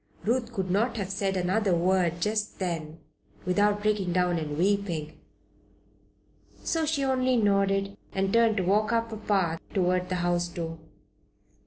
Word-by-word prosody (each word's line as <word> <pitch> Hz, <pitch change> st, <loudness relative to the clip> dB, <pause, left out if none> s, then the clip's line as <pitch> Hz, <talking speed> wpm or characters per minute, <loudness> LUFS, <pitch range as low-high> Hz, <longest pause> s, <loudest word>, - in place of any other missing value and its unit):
Ruth 235 Hz, +1 st, 0 dB
could 190 Hz, -5 st, -2 dB
not 230 Hz, +5 st, +1 dB
have 195 Hz, -2 st, -3 dB
said 195 Hz, 0 st, -1 dB
another 185 Hz, +1 st, +1 dB
word 175 Hz, -1 st, +1 dB
just 210 Hz, +2 st, -1 dB
then 165 Hz, -4 st, -4 dB, 0.4 s
without 205 Hz, +3 st, +2 dB
breaking 205 Hz, -4 st, +1 dB
down 180 Hz, -1 st, +2 dB
and 150 Hz, -2 st, -4 dB
weeping, 175 Hz, -4 st, -1 dB, 1.4 s
so 325 Hz, -2 st, 0 dB
she 295 Hz, -2 st, 0 dB
only 255 Hz, -1 st, +2 dB
nodded 195 Hz, -2 st, +2 dB, 0.2 s
and 195 Hz, 0 st, -1 dB
turned 230 Hz, -2 st, +4 dB
to 190 Hz, -, +1 dB
walk 210 Hz, +5 st, +2 dB
up 230 Hz, 0 st, 0 dB
a 220 Hz, -, -5 dB
path 190 Hz, -6 st, 0 dB, 0.2 s
toward 180 Hz, -1 st, +1 dB
the 185 Hz, -, -1 dB
house 175 Hz, 0 st, +1 dB
door. 165 Hz, -1 st, -6 dB
195 Hz, 150 wpm, -27 LUFS, 175-215 Hz, 1.4 s, turned